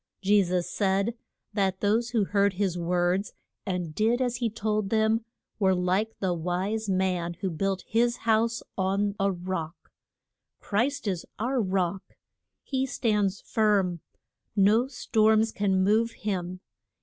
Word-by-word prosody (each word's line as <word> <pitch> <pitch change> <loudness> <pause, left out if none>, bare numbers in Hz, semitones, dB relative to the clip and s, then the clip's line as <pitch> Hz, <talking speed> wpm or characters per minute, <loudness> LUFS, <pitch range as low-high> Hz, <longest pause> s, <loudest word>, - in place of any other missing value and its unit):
Je 205 +1 +5
sus 180 -1 -1
said 200 +2 0 0.4
that 190 -2 0
those 225 +3 +1
who 225 -3 +1
heard 200 0 +2
his 190 -2 -1
words 175 +3 0 0.3
and 180 -4 -2
did 225 +7 +2
as 245 -2 0
he 240 -2 0
told 215 -2 -1
them 220 +1 +2 0.4
were 190 -2 +3
like 185 +5 0
the 185 -2 0
wise 185 +6 -2
man 180 -2 0
who 190 - -1
built 190 +3 -1
his 235 +1 +2
house 230 +1 +2
on 200 +2 0
a 195 0 +2
rock. 175 -2 -5 0.7
Christ 250 +5 -1
is 185 -4 -1
our 245 +3 0
Rock. 190 -1 -2 0.5
He 265 -1 -1
stands 210 -5 0
firm. 200 -5 +1 0.6
No 215 +5 +4
storms 220 -4 +2
can 190 -2 +1
move 220 +4 +3
him. 185 -3 -4
200 Hz, 135 wpm, -27 LUFS, 185-220 Hz, 0.7 s, Je